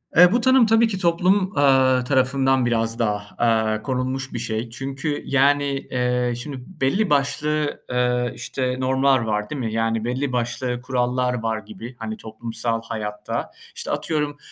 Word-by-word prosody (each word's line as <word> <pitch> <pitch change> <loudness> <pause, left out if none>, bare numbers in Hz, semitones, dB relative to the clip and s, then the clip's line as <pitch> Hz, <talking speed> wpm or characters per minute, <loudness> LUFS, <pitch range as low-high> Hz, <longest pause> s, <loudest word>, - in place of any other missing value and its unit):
Eee, 180 +1 +8
bu 240 +1 +2
tanım 260 -1 +5
tabii 225 +1 +4
ki 200 - -3
toplum, 185 +3 +2
aaa, 130 -2 +4
tarafından 130 0 +2
biraz 115 -1 0
daha, 105 -2 -2
aaa, 110 -2 +1
konulmuş 130 +2 -3
bir 120 - -3
şey. 115 0 -3
Çünkü 135 +4 -4
yani, 140 +1 +3 0.3
eee, 125 -1 0
şimdi 135 +2 -6
belli 185 +5 0
başlı, 150 +1 0
eee, 125 -1 +1
işte 125 0 -2
normlar 130 +1 +3
var, 105 -2 -2
değil 150 - -4
mi? 110 -3 -3
Yani 115 0 0
belli 130 +2 -1
başlı 120 0 -2
kurallar 125 0 0
var 110 -1 -1
gibi, 120 +3 -10
hani, 110 -1 -5
toplumsal 115 +1 -3
hayatta. 105 -2 -4 0.2
İşte, - - -4
atıyorum, 150 -2 -1
125 Hz, 155 wpm, -22 LUFS, 115-140 Hz, 0.3 s, Eee